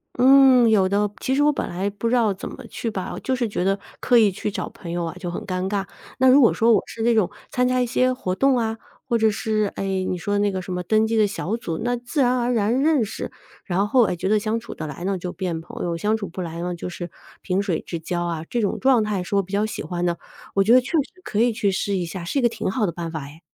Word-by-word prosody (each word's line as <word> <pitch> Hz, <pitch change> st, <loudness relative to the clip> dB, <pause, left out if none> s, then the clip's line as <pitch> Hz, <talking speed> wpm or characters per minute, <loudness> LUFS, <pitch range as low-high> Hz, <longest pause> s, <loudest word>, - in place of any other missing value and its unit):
嗯， 260 Hz, -1 st, +6 dB
有 195 Hz, -4 st, +4 dB
的。 205 Hz, +1 st, +1 dB
其 265 Hz, -, 0 dB
实 290 Hz, -, +3 dB
我 295 Hz, -, +5 dB
本 -, -, -3 dB
来 190 Hz, +3 st, -2 dB
不 205 Hz, +3 st, -3 dB
知 250 Hz, -, +2 dB
道 225 Hz, -5 st, +3 dB
怎 185 Hz, -, -7 dB
么 -, -, -10 dB
去 230 Hz, -, -4 dB
吧， 190 Hz, -4 st, -4 dB
就 260 Hz, -, 0 dB
是 240 Hz, -2 st, -1 dB
觉 200 Hz, -, -2 dB
得 195 Hz, +1 st, +2 dB, 0.2 s
刻 245 Hz, -, +4 dB
意 215 Hz, -4 st, +5 dB
去 200 Hz, -, -3 dB
找 -, -, -4 dB
朋 170 Hz, -, -9 dB
友 175 Hz, 0 st, -2 dB
啊， 165 Hz, -, -5 dB
就 180 Hz, -, -4 dB
很 175 Hz, -, -4 dB
尴 185 Hz, 0 st, -2 dB
尬。 200 Hz, -2 st, -1 dB, 0.3 s
那 260 Hz, -, +4 dB
如 265 Hz, +3 st, +7 dB
果 235 Hz, -, +6 dB
说 230 Hz, +1 st, +3 dB
我 200 Hz, -, +4 dB
是 225 Hz, -, -5 dB
那 235 Hz, +1 st, +4 dB
种 215 Hz, -5 st, +2 dB, 0.2 s
参 250 Hz, 0 st, +2 dB
加 255 Hz, 0 st, +1 dB
一 -, -, +2 dB
些 255 Hz, +1 st, +2 dB
活 190 Hz, -8 st, -2 dB
动 270 Hz, +5 st, +3 dB
啊， 225 Hz, -1 st, -1 dB, 0.3 s
或 235 Hz, -, +2 dB
者 220 Hz, -1 st, +4 dB
是， 215 Hz, 0 st, -1 dB
哎， -, -, -3 dB, 0.3 s
你 180 Hz, -, -1 dB
说 205 Hz, +3 st, -1 dB
那 205 Hz, 0 st, +2 dB
个 190 Hz, -, -3 dB
什 185 Hz, 0 st, -6 dB
么 180 Hz, -, -2 dB
登 215 Hz, +3 st, +3 dB
记 225 Hz, -, -1 dB
的 215 Hz, -2 st, +4 dB
小 205 Hz, +1 st, -3 dB
组， 165 Hz, -8 st, -4 dB
那 245 Hz, 0 st, +1 dB
自 245 Hz, +5 st, -2 dB
然 250 Hz, 0 st, +3 dB
而 240 Hz, +1 st, 0 dB
然 235 Hz, +3 st, +1 dB
认 295 Hz, -7 st, +3 dB
识， 205 Hz, -, -6 dB, 0.3 s
然 195 Hz, +2 st, 0 dB
后， 245 Hz, +2 st, +4 dB
哎， 180 Hz, -, -1 dB
觉 175 Hz, -, -3 dB
得 210 Hz, +1 st, +3 dB
相 220 Hz, +2 st, -1 dB
处 235 Hz, -, -9 dB
得 155 Hz, -, -6 dB
来 150 Hz, +4 st, -7 dB
呢 195 Hz, +1 st, 0 dB
就 180 Hz, 0 st, -4 dB
变 170 Hz, -3 st, -3 dB
朋 165 Hz, -, -8 dB
友， 170 Hz, -1 st, -1 dB
相 210 Hz, +6 st, 0 dB
处 200 Hz, -3 st, -5 dB
不 185 Hz, -, -6 dB
来 170 Hz, -1 st, -5 dB
呢 180 Hz, 0 st, -2 dB
就 175 Hz, -, -6 dB
是 175 Hz, -1 st, -6 dB, 0.3 s
萍 190 Hz, +1 st, 0 dB
水 190 Hz, -5 st, -1 dB
之 170 Hz, -, -5 dB
交 175 Hz, +1 st, -3 dB
啊， 165 Hz, -2 st, -3 dB
这 240 Hz, -, -1 dB
种 205 Hz, -3 st, -1 dB
状 260 Hz, -4 st, +4 dB
态 210 Hz, -3 st, -1 dB
是 200 Hz, -, -3 dB
我 200 Hz, -, +3 dB
比 190 Hz, -, -12 dB
较 205 Hz, +2 st, +2 dB
喜 215 Hz, -, -5 dB
欢 175 Hz, -1 st, -3 dB
的， 170 Hz, -1 st, 0 dB, 0.4 s
我 195 Hz, -, +4 dB
觉 225 Hz, +5 st, +4 dB
得 255 Hz, -, +7 dB
确 255 Hz, -, -9 dB
实 335 Hz, +4 st, -1 dB
可 210 Hz, -, -2 dB
以 235 Hz, +1 st, +3 dB
去 210 Hz, -3 st, +1 dB
试 195 Hz, +1 st, -1 dB
一 180 Hz, -2 st, -1 dB
下， 175 Hz, +1 st, -6 dB
是 275 Hz, -, 0 dB
一 -, -, +1 dB
个 240 Hz, -, +4 dB
挺 220 Hz, -, -3 dB
好 215 Hz, -2 st, 0 dB
的 -, -, -1 dB
办 170 Hz, -1 st, -5 dB
法 160 Hz, -3 st, -4 dB
哎。 145 Hz, +3 st, -11 dB
205 Hz, 315 characters per minute, -23 LUFS, 180-240 Hz, 0.4 s, 如